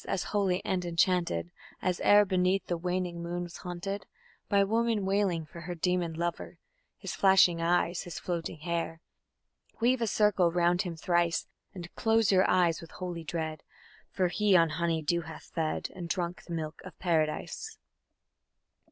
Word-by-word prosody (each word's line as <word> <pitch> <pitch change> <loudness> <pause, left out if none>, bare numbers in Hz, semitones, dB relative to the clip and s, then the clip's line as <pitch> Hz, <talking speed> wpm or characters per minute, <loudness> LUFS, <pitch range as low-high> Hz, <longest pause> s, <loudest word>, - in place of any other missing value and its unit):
as 185 - -1
holy 195 -3 +1
and 185 -1 0
enchanted 170 - +1 0.3
As 180 -1 -1
ere 205 0 +6
beneath 185 0 +1
the 175 - -1
waning 180 0 -2
moon 175 +1 -3
was 175 -1 -8
haunted 190 +3 -5 0.4
By 200 -1 +4
woman 225 0 +1
wailing 190 -4 +1
for 170 +3 -11
her 175 +1 -5
demon 175 -1 0
lover... 170 +1 -4 0.4
His - - -6
flashing 190 -3 +5
eyes, 175 +1 +1
his 175 -3 -7
floating 170 -3 -4
hair! 165 0 -2 0.8
Weave 245 +2 +2
a 230 - +1
circle 195 -4 +3
round 175 +1 +2
him 175 -4 -4
thrice, 170 +1 +1 0.3
And 175 -2 -8
close 225 -1 +3
your 185 -1 +4
eyes 175 -3 +3
with 165 - -11
holy 175 -2 -6
dread, 160 -1 -4 0.5
For 185 -2 0
he 200 +2 +4
on 165 -1 +4
honey 165 0 -1
dew 170 +3 +1
hath 160 -1 -11
fed 160 -2 -1
And 175 -2 -6
drunk 175 -1 -3
the 170 - -6
milk 155 -1 -5
of 185 - -11
Paradise. 160 -4 -1
175 Hz, 160 wpm, -30 LUFS, 170-190 Hz, 0.8 s, ere